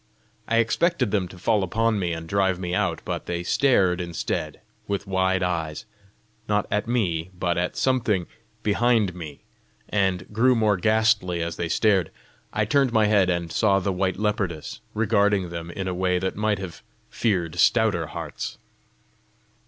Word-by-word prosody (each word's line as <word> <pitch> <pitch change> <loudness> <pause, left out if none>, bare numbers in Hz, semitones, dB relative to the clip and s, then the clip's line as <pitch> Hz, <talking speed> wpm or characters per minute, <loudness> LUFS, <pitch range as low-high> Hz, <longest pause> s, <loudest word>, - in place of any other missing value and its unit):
I 115 - +1
expected 125 - +2
them 100 -4 0
to 95 - -13
fall 105 +3 +1
upon 110 +3 +1
me 90 -3 -1
and 80 0 -5
drive 95 0 +1
me 90 -1 -4
out, - - 0
but - - -4
they 85 0 -2
stared 95 -5 +2
instead, 85 -2 -3 0.3
with 100 0 -2
wide 95 -1 +1
eyes 80 -4 -2 0.6
not 105 0 +2
at 105 +2 0
me, 90 -9 0
but 90 -1 0
at 90 0 -1
something 115 -9 +1 0.4
behind 110 -2 +2
me, 80 -5 -9 0.5
and 95 -3 0
grew 125 +4 +4
more 105 -3 +2
ghastly 110 -4 +2
as 85 0 -4
they 85 -1 -3
stared. 95 -2 +2 0.4
I 105 - 0
turned 135 +3 +2
my 110 -2 +3
head, 100 -3 +3
and 85 -2 -1
saw 100 +1 +3
the 95 0 -1
white 95 0 -1
leopardess, 100 -6 -2 0.2
regarding 100 -3 +2
them 85 0 -6
in 95 +2 -4
a 90 - -1
way 90 0 +1
that 95 +1 -2
might 105 0 0
have 90 -3 -8 0.3
feared 90 -7 -1
stouter 100 -7 +3
hearts. - - -6
95 Hz, 160 wpm, -24 LUFS, 90-110 Hz, 0.6 s, grew